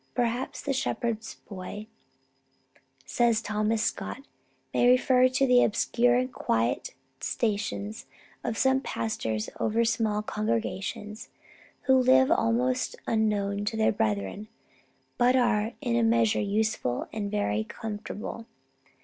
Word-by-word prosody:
"Perhaps 245 +1 -1
the 280 - -1
shepherd's 230 -4 -2
boy," 200 +1 -7 1.2
says 235 -2 +2
Thomas 215 +1 0
Scott, 275 +4 -3 0.5
"may 245 - +3
refer 255 0 +5
to 255 +1 +2
the 250 -1 +5
obscure 240 +2 +2
and 255 +1 0
quiet 115 +3 -1 0.2
stations 215 -1 -2 0.4
of 230 -3 -2
some 265 +2 +3
pastors 110 - -2
over 230 +2 +1
small 220 -2 0
congregations, 215 -1 -3 0.5
who 265 - +4
live 260 +2 +5
almost 250 -2 +1
unknown 205 -2 0
to 220 +1 -2
their 220 - +3
brethren, 105 - -2 0.7
but 250 +1 +4
are 230 -3 +2
in 240 -4 0
a 235 - +3
measure 230 -1 +3
useful 205 - -1
and 210 -2 -3
very 110 - 0
comfortable." 220 - -6
225 Hz, 115 wpm, -27 LUFS, 210-245 Hz, 1.2 s, refer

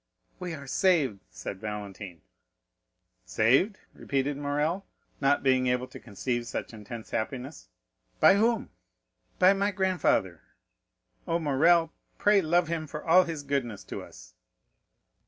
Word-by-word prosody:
"We 180 -3 -4
are 140 -2 -10
saved!" 145 - +2
said 95 +1 -7
Valentine. 100 -5 -7 1.0
"Saved?" 135 - +2 0.2
repeated 140 +1 -2
Morrel, 150 +6 -1 0.4
not 140 +1 +2
being 130 -1 +3
able 125 0 +1
to - - -10
conceive 120 +2 -3
such - - -5
intense 110 +1 -9
happiness; 125 - -4 0.5
"by - - +7
whom?" 225 +4 +1 0.7
"By 185 +1 +6
my 200 +1 +1
grandfather. 185 - 0 0.9
Oh, 165 - +1
Morrel, 165 +2 +3 0.2
pray 205 -1 +4
love 170 +1 +2
him 160 -1 -3
for 150 +1 -7
all 180 +2 +6
his 160 -4 -5
goodness 135 -7 -2
to - - -7
us!" - - -14
145 Hz, 125 wpm, -28 LUFS, 120-175 Hz, 1.0 s, by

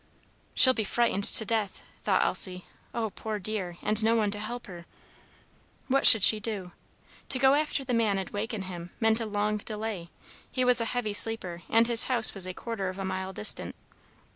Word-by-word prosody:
"She'll 260 - +6
be 225 - -3
frightened 205 -1 -1
to 220 - +8
death," 215 -3 -3 0.2
thought - - 0
Elsie. 180 -1 -4 0.3
"Oh, 225 -3 -4
poor 215 +1 -6
dear, 190 -3 -3
and 215 +1 0
no 225 +1 +1
one 210 -3 -1
to 205 - -6
help 235 +3 -8
her!" 175 -5 -13 1.0
What 275 +1 +5
should 220 -5 +9
she 215 - +6
do? 205 -4 -6 0.6
To 260 - -1
go 265 +1 +3
after 295 -1 -2
the 250 - -4
man 220 -4 0
and 190 - -5
waken 210 0 -5
him 175 -2 -9
meant 225 0 +1
a 225 - -5
long 210 0 -3
delay. 210 -4 -7 0.4
He 255 -1 -2
was 250 -1 +3
a - - -2
heavy 225 -3 -4
sleeper, 205 -5 0
and 225 +1 +2
his 235 -1 +4
house 240 -4 +4
was 190 -2 -2
a 185 - -6
quarter 220 -5 -6
of 185 - -9
a 195 - -6
mile 190 0 -5
distant. 210 +3 -2
215 Hz, 195 wpm, -26 LUFS, 195-230 Hz, 1.0 s, should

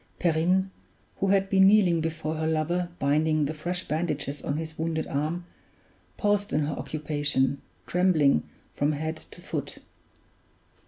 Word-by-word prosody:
Perrine, 180 +3 +2 0.5
who 195 - 0
had 195 0 +3
been 190 -1 +5
kneeling 190 -5 +5
before 155 -1 -2
her 160 0 -1
lover 170 +3 0
binding 155 +2 +2
the 150 - -2
fresh 175 +4 -3
bandages 150 -3 -2
on 145 - -2
his 160 0 -5
wounded 160 0 -2
arm, 155 +5 -2 0.7
paused 205 0 +1
in 150 - +2
her 150 +1 -1
occupation, 145 -3 -1 0.2
trembling 165 - +3 0.3
from 145 +1 +1
head 160 +2 -4
to - - -14
foot. - - -5
160 Hz, 140 wpm, -27 LUFS, 150-180 Hz, 0.7 s, been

